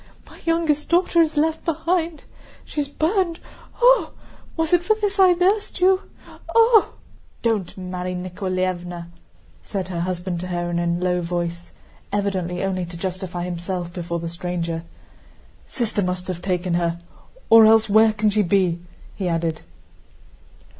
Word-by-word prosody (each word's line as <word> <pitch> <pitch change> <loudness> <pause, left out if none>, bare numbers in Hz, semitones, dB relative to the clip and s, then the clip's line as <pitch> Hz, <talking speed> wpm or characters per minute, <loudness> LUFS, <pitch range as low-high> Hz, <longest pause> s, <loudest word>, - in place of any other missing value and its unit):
My - - -16
youngest 325 -3 +1
daughter 345 0 +4
is 320 -2 +1
left 315 +1 +1
behind. 330 0 -1 0.4
She's 295 -2 -3
burned! 335 +3 0 0.4
Ooh! - - +6 0.5
Was 325 +1 0
it 350 -1 +4
for 435 +4 +3
this 405 -1 -1
I 370 -2 +7
nursed 385 +4 +1
you.... 375 +1 +4 0.6
Ooh!" 455 -1 +6 0.6
"Don't, 215 -7 -1
Mary 180 0 -4
Nikoláevna!" 180 -1 -3 0.5
said 190 -2 -4
her 175 -2 -3
husband 175 0 -2
to 180 - -5
her 175 -1 -2
in 170 - 0
a 175 - 0
low 180 +1 0
voice, 170 0 -4 0.4
evidently 190 -3 -1
only 190 -1 -1
to 170 0 -9
justify 180 -1 -4
himself 175 0 -4
before 170 -1 -3
the 170 0 -4
stranger. 170 -1 -4 0.8
"Sister 225 -4 -1
must 180 -1 -2
have 175 -2 -4
taken 180 -2 -1
her, 170 0 0 0.5
or 225 -1 +9
else 220 0 +5
where 220 +1 +5
can 215 0 +1
she 210 +1 +2
be?" 180 -2 +2 0.4
he 185 -3 -2
added. 165 -1 -1
185 Hz, 145 wpm, -22 LUFS, -, 0.8 s, or